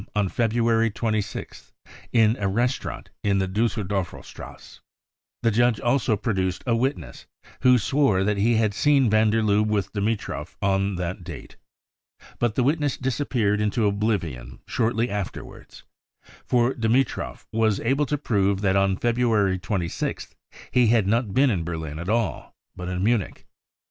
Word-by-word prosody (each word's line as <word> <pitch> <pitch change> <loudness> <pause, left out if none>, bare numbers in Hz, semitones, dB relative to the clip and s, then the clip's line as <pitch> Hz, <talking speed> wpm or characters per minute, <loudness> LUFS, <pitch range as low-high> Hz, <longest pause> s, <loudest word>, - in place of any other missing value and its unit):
on 105 -2 +2
February 115 0 +1
26th 110 -1 -4 0.4
in 115 -1 +4
a 100 - 0
restaurant 120 +6 -2
in 100 -1 +2
the 95 -1 0
Dusseldorferstrasse. 100 -2 -4 0.6
The 115 - +3
judge 120 0 +2
also 120 -3 +1
produced 95 -4 -2
a 120 -3 +2
witness, 130 +5 -3 0.3
who 125 0 +6
swore 120 -5 +2
that 105 +1 0
he 115 +4 +2
had 110 -2 +1
seen 135 -1 +3
van 110 0 +4
der 110 +1 +1
Lubbe 105 0 +2
with 105 -3 -1
Dimitrov 100 -7 -3
on 100 0 +1
that 90 0 -4
date. 85 -4 -9 0.8
But 120 -3 0
the 125 - +2
witness 145 0 +1
disappeared 120 -6 0
into 105 +1 +1
oblivion 95 - -2
shortly 115 +1 0
afterwards: 100 -4 -7 0.6
for 125 +1 +2
Dimitrov 120 +3 -1
was 110 -2 +2
able 135 +5 +1
to 150 - 0
prove 100 -7 0
that 95 -2 +2
on 95 -1 +2
February 115 -6 +1
26th 90 -3 -3 0.4
he 125 -2 +4
had 110 -2 +3
not 110 +1 +1
been 135 0 +4
in 90 -6 -1
Berlin 80 -2 -5
at 85 +3 -5
all, 115 -3 -1 0.2
but 90 0 -6
in 90 0 -2
Munich. 110 -3 0
110 Hz, 145 wpm, -24 LUFS, 95-120 Hz, 0.8 s, who